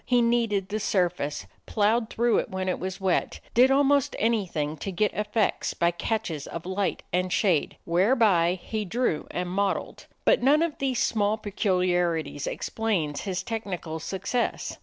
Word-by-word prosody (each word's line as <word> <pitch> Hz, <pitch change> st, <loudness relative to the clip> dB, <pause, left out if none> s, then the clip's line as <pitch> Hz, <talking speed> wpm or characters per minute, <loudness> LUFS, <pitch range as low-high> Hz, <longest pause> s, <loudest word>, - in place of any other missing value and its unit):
He 245 Hz, -1 st, +2 dB
kneaded 230 Hz, -5 st, +1 dB
the 215 Hz, +1 st, -2 dB
surface, 175 Hz, -8 st, -1 dB, 0.2 s
ploughed 220 Hz, +2 st, +1 dB
through 235 Hz, 0 st, +2 dB
it -, -, -3 dB
when 190 Hz, 0 st, -3 dB
it 185 Hz, -, -1 dB
was 190 Hz, +1 st, -4 dB
wet, 190 Hz, -2 st, 0 dB
did 250 Hz, +2 st, +6 dB
almost 280 Hz, 0 st, +3 dB
anything 185 Hz, -10 st, 0 dB
to 195 Hz, -, -4 dB
get 205 Hz, +3 st, 0 dB
effects 210 Hz, 0 st, 0 dB
by 170 Hz, 0 st, +2 dB
catches 175 Hz, -5 st, -3 dB
of 170 Hz, 0 st, -7 dB
light 190 Hz, +2 st, -2 dB
and 180 Hz, +1 st, 0 dB
shade 185 Hz, -5 st, +1 dB
whereby 185 Hz, -1 st, +3 dB
he 215 Hz, -1 st, -3 dB
drew 205 Hz, -5 st, -1 dB
and 180 Hz, 0 st, -3 dB
modeled. 195 Hz, +2 st, -2 dB, 0.2 s
But -, -, +4 dB
none 290 Hz, +5 st, +4 dB
of 335 Hz, -3 st, -1 dB
these 265 Hz, -2 st, 0 dB
small 215 Hz, -2 st, +1 dB
peculiarities 180 Hz, -7 st, 0 dB
explains 180 Hz, -11 st, -2 dB
his 185 Hz, -1 st, -2 dB
technical 185 Hz, -8 st, -4 dB
success. 195 Hz, +8 st, -2 dB
200 Hz, 155 wpm, -26 LUFS, 180-225 Hz, 0.2 s, did